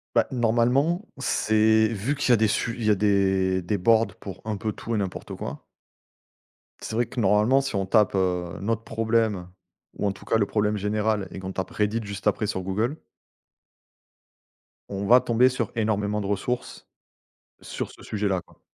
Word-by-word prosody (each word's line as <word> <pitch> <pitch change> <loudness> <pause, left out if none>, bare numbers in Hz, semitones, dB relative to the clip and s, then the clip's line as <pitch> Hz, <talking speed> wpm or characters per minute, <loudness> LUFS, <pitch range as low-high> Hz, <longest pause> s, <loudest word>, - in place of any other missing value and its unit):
Bah, - - +4
normalement, 125 - +2
c'est 110 -4 +3
vu 115 +6 -2
qu'il 145 - -1
y - - +7
a - - +5
des 110 +1 +3
su 115 +2 -1
il 115 - -2
y - - +3
a 105 - +5
des 95 -2 +2
des 95 +4 -1
boards 115 +4 +3
pour 95 -2 -9
un 110 -1 -2
peu 110 +2 -3
tout 115 +2 -4
et - - +1
n'importe 95 -3 -4
quoi. - - -7 1.2
C'est 110 - -5
vrai 120 +1 +2
que 125 - -6
normalement 105 +6 +4
si 135 -5 -4
on 95 -1 0
tape, 105 0 +3
heu, 90 -3 -1
notre 115 +2 -1
problème, 110 -5 0 0.5
ou - - -2
en - - +1
tout 100 - -12
cas 115 - +2
le 105 - +2
problème 105 +1 0
général 105 0 0
et - - -7
qu'on 95 0 -6
tape 95 - -4
Reddit 105 +2 0
juste 100 0 -5
après 105 +1 +1
sur 95 - -2
google 110 - -1 1.9
on 100 0 -3
va 125 +3 +8
tomber 125 +1 +3
sur 125 - -3
énormément 105 -2 0
de 100 - -4
ressources, 105 +5 -3 0.7
sur - - -5
ce - - -15
sujet-là 100 -3 -1
quoi. - - -24
105 Hz, 185 wpm, -25 LUFS, 100-115 Hz, 1.9 s, va